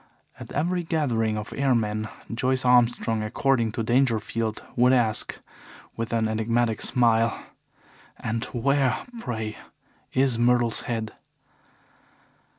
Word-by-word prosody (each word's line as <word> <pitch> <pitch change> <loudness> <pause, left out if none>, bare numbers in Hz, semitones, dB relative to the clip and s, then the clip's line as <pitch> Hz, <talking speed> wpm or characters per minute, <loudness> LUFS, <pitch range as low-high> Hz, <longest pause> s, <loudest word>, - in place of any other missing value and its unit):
At - - -9
every 175 +5 0
gathering 125 -10 0
of 105 +1 -6
airmen, 110 -5 0 0.2
Joyce 130 +2 0
Armstrong, 120 -2 +3
according 115 +1 +1
to 115 - -2
Dangerfield, 115 -2 0
would 125 +1 +4
ask, 115 -4 +1 0.6
with 115 0 -4
an 115 -1 +1
enigmatic 110 +1 0
smile: 115 -2 +2 0.8
"And 115 +1 -3
where, 135 +1 0
pray, 110 - -4 0.5
is 130 -3 +2
Myrtle's 120 -1 +2
head?" 110 -2 -3
115 Hz, 105 wpm, -25 LUFS, 110-130 Hz, 0.8 s, would